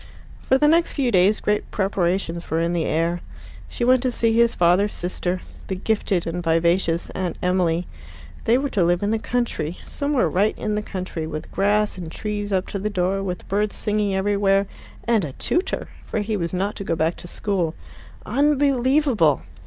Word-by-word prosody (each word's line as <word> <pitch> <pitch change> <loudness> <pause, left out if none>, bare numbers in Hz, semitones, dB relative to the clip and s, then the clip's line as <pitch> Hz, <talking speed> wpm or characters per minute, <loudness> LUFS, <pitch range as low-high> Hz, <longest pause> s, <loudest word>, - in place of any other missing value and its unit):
For 265 - +3
the 295 - +4
next 335 +2 +3
few 265 -4 0
days 195 +2 +4
great 210 0 0
preparations 180 -3 -1
were 160 - +1
in 170 +1 0
the 170 -2 0
air. 170 +2 0 0.5
She - - -4
went 255 +1 +4
to 255 -1 0
see 230 -1 +1
his 235 0 +3
father's 180 +4 +3
sister, 180 +1 -2 0.3
the 190 - -2
gifted 195 -2 0
and 175 +1 -3
vivacious 170 +1 +1
Aunt 185 -2 -3
Emily. 180 -2 +1 0.6
They 235 +2 +4
were 275 +1 -2
to 190 - +2
live 175 +2 +2
in 205 - +1
the 225 - +1
country 220 -10 -2
somewhere 285 - 0
right 195 +7 +1
in 215 - -2
the 210 - 0
country, 185 -6 -5
with 155 -1 -6
grass 205 0 +1
and 165 -3 -6
trees 205 +1 -4
up 190 -1 +1
to 200 - -3
the 210 +2 -1
door, 190 -1 0
and 185 -2 -4
birds 205 +2 0
singing 210 -2 0
everywhere, 200 0 +2 0.4
and 230 -4 +2
a 145 -4 -5
tutor. 355 - -1
For 215 - -2
he 210 +1 -2
was 170 -4 -2
not 195 +3 -1
to - - -4
go 170 - -1
back 160 +2 0
to - - -10
school. 175 -4 -1 0.5
Unbelievable! 270 - +2
195 Hz, 185 wpm, -23 LUFS, 175-220 Hz, 0.6 s, the